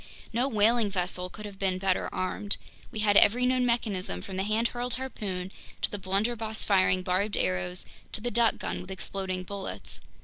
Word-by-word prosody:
No 245 +4 +2
whaling 225 -2 +3
vessel 180 -1 -1
could 210 +3 -9
have 200 -2 -9
been 190 -2 +1
better 185 0 +1
armed. 185 +2 0 0.3
We 215 - -4
had 205 -1 +3
every 245 +5 +6
known 255 0 +3
mechanism, 195 - 0
from 190 - -6
the 190 - 0
hand 215 +4 +2
hurled 245 0 -1
harpoon, 195 -8 -4 0.3
to - - +1
the 205 - -4
blunderbuss 220 +3 0
firing 185 -2 +3
barbed 190 +3 +1
arrows, 90 -1 -1 0.3
to - - +5
the 240 +3 -3
duck 235 -1 +3
gun - - -3
with 180 - -11
exploding 190 -1 -2
bullets. 195 +1 -5
200 Hz, 180 wpm, -29 LUFS, 185-230 Hz, 0.3 s, every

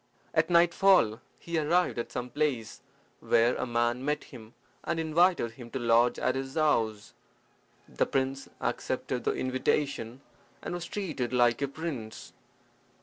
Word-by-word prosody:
At - - +2
nightfall 175 - +4 0.2
he 170 -1 -2
arrived 170 -2 +1
at 120 - -4
some 125 0 -5
place, 140 -7 -2 0.4
where 120 +2 +3
a 130 - -3
man 120 +1 0
met 150 +1 -1
him, 115 -4 -13 0.3
and 165 - -2
invited 165 -5 +2
him 120 0 -11
to 135 - -4
lodge 120 0 +3
at - - +1
his 135 +1 -5
house. 115 -10 +1 0.7
The - - -1
prince 135 0 -2
accepted - - -3
the - - +2
invitation, 130 -1 -1 0.4
and - - -4
was 175 -1 -4
treated 155 -13 -3
like 120 0 +3
a 140 - +1
prince. 135 -7 -6
130 Hz, 145 wpm, -29 LUFS, 120-160 Hz, 0.7 s, nightfall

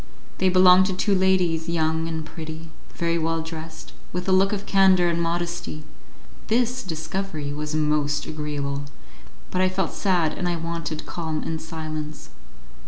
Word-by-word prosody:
They 190 - +4
belonged 185 0 +7
to 190 - -1
two 200 +2 +1
ladies, 180 -4 +2
young 160 -1 +1
and 160 -1 -3
pretty, 160 +1 -8 0.2
very 170 0 0
well 165 0 0
dressed, 160 0 -8 0.2
with 180 +1 -4
a - - +3
look 190 +1 +4
of 205 -1 -3
candour 190 -3 +5
and 170 0 0
modesty. 170 -2 -2 0.6
This 245 +2 +1
discovery 160 -3 -4
was 150 +1 -3
most 150 -1 +1
agreeable, 145 -2 -3 0.7
but 185 - +1
I 185 - +4
felt 185 -2 -1
sad 175 -6 +1
and 180 - -1
I 175 - 0
wanted 165 -2 -4
calm 160 -3 -3
and 160 -1 -3
silence. 155 -1 -6
165 Hz, 155 wpm, -24 LUFS, 155-185 Hz, 0.7 s, belonged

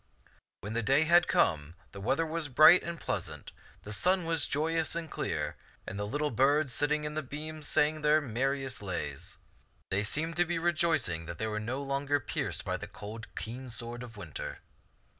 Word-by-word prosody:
When 105 +3 -5
the 115 - +1
day 135 +7 +4
had 170 +2 +5
come, 75 0 +2 0.2
the 100 - -9
weather 135 +10 +1
was 160 -1 -1
bright 155 +7 +8
and 170 -1 -5
pleasant, - - -4 0.3
the 105 - -4
sun 180 - +2
was 165 -2 +1
joyous 160 +3 0
and 170 -1 -3
clear, 75 -2 -2 0.3
and 100 - -5
the 105 - -2
little 150 +6 -1
birds 135 +3 +3
sitting 150 +1 +1
in 150 0 -4
its 155 -4 -3
beams 155 +1 -5
sang 155 +1 +2
their 150 +1 +5
merriest 135 0 -2
lays. 95 -4 -4 0.5
They 95 +1 +2
seemed 160 +10 -1
to 175 - +4
be 175 0 -1
rejoicing 160 - +1
that 85 0 -6
they 110 - -1
were 105 -1 -2
no 125 +6 -3
longer 140 +1 0
pierced - - -2
by - - -1
the - - -7
cold, 110 +3 -8
keen 125 +3 -5
sword 120 +1 -5
of 115 -3 -9
winter. 85 -7 -6
140 Hz, 185 wpm, -31 LUFS, 110-155 Hz, 0.5 s, bright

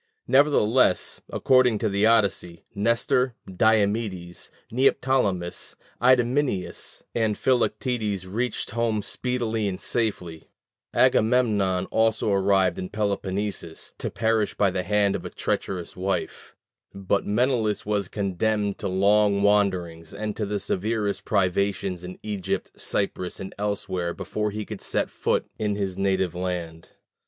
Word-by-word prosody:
Nevertheless, 130 -7 +3
according 130 -4 +3
to 110 - 0
the 100 +1 +2
Odyssey, 100 -6 +1
Nestor, 115 +4 +1
Diomedes, 100 -2 0 0.2
Neoptolemus, 125 -8 +1 0.3
Idomeneus, 125 -6 +1
and 110 -3 0
Philoctetes 120 -6 0
reached 110 +5 -3
home 115 -2 0
speedily 115 -4 -1
and 95 -2 -3
safely; 90 -9 -2 0.4
Agamemnon 105 -6 +3
also 110 -1 +2
arrived 95 -2 +2
in 90 - -4
Peloponnesus, 100 -4 -3
to - - -2
perish 110 -2 0
by 100 -2 +2
the 90 0 -1
hand 100 +1 +2
of - - -4
a - - -5
treacherous 90 -3 -3
wife; 95 +1 -3 0.4
but 100 +1 -1
Menelaus 115 -1 +1
was 105 -2 0
condemned 100 +1 -1
to 100 - -2
long 100 +2 +3
wanderings 95 -5 +1
and 105 +1 -3
to 105 - -2
the 105 0 -1
severest 105 +2 -1
privations 95 -1 0
in 90 +1 -8
Egypt, 105 -4 -3
Cyprus, 90 -1 -2
and 95 -1 -7
elsewhere 95 -4 -2
before 105 0 -2
he 105 +1 -5
could 105 -3 -7
set - - -1
foot - - 0
in 105 -1 0
his 100 -2 -2
native 95 -2 0
land. 90 -2 -4
100 Hz, 125 wpm, -25 LUFS, 95-110 Hz, 0.4 s, Nevertheless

